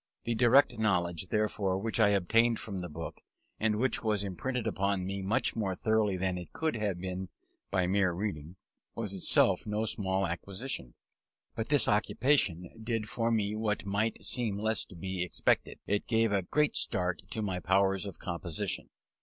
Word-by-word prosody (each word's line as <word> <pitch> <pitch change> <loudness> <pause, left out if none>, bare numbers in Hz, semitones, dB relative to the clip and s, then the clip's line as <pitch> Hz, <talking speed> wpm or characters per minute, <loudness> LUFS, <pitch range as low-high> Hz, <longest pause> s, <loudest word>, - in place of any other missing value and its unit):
The 120 - -1
direct 120 +1 +4
knowledge, 90 -4 +1
therefore, 105 -2 0
which 110 +4 -2
I 105 -2 +6
obtained 115 +4 +3
from 100 -4 -5
the 90 - -5
book, 80 +2 -7 0.4
and 110 -1 +2
which 120 +3 +1
was 105 -2 +1
imprinted 115 +6 -3
upon 100 -1 0
me 100 +1 -3
much 110 +8 +1
more 100 -4 -1
thoroughly 110 -2 +1
than 90 0 -1
it 90 - -10
could 160 -1 -1
have 105 -5 -1
been 95 0 -4 0.4
by 95 -2 +1
mere 95 0 +2
reading, 85 -3 -4 0.4
was 105 -4 -3
itself 95 +2 +3
no 105 +1 0
small 95 -2 0
acquisition. 95 - -4 0.6
But 110 - -3
this 145 -3 +4
occupation 105 - +2
did 115 -2 -1
for 115 +1 0
me 105 -2 +1
what 110 -1 -1
might 100 +3 -1
seem 115 -5 0
less 110 +1 0
to 95 - -14
be 95 +1 -4
expected; 90 -2 +1
it 100 +1 -1
gave 115 -2 +2
a 100 -1 +2
great 150 +11 +1
start 90 -1 0
to 110 - -3
my 95 -3 -2
powers 95 +3 +2
of 95 - -8
composition. 85 -2 -3
100 Hz, 170 wpm, -31 LUFS, 95-110 Hz, 0.6 s, I